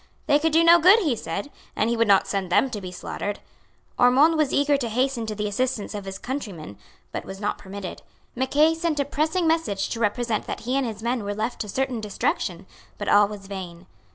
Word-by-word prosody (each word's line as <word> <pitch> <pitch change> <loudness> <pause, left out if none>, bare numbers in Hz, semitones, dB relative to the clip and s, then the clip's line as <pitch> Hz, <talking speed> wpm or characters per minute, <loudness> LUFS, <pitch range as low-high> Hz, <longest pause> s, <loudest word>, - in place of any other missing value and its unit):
They 290 -1 +4
could 320 +1 +1
do 325 +2 +4
no 340 +1 +7
good, 370 +6 +7
he 315 - +1
said, 200 - -5 0.2
and 215 - +1
he 235 - +1
would 230 -1 +2
not 200 -1 +5
send 195 -3 -3
them 260 +8 +3
to 210 - -4
be 185 -1 -7
slaughtered. 205 +3 -5 0.6
Ormond 270 +7 +5
was 305 -3 +1
eager 285 +1 +3
to 255 -4 -2
hasten 250 0 0
to 215 - -3
the 210 0 -2
assistance 240 +1 -2
of 205 -2 -6
his 195 0 -6
countrymen, 195 - -6 0.3
but - - -4
was 195 0 -9
not 205 - -2
permitted. 195 -1 -7 0.3
Mackay 285 +5 +3
sent 325 -2 -1
a 280 - +1
pressing 315 +5 0
message 320 -12 0
to 230 - -4
represent 225 0 -1
that - - -5
he 250 +3 -2
and 275 -2 +1
his 220 -1 -7
men 240 -1 -1
were 205 0 -3
left 220 +3 -3
to 210 - -5
certain 260 0 -2
destruction; 195 -3 -2 0.3
but 205 - -3
all 205 0 +6
was 205 -1 -9
vain. 185 -3 -8
230 Hz, 220 wpm, -24 LUFS, 200-280 Hz, 0.6 s, no